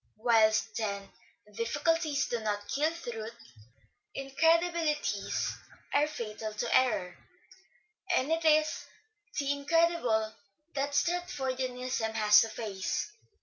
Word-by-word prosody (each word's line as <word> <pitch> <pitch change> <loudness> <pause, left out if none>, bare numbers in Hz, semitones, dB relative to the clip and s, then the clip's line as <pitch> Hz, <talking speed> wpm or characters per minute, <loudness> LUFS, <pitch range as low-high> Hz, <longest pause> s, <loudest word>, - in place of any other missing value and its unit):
Whilst, 220 -2 +3
then, 200 -3 -3 0.4
difficulties 290 +6 0
do 240 - -2
not 205 -2 -3
kill 300 +3 +2
truth, 235 -8 -6 0.8
incredibilities 325 +3 +1 0.4
are 295 - +4
fatal 215 -6 -6
to 230 +2 0
error; 210 -9 +2 1.0
and 265 +5 0
it 330 0 +1
is 310 -1 +3 0.5
the 280 -1 +1
incredible 285 -7 +1 0.4
that 285 0 -1
Stratfordianism 260 -8 -1
has 210 -1 +6
to 225 - -1
face. 210 - -3
255 Hz, 100 wpm, -30 LUFS, 220-305 Hz, 1.0 s, has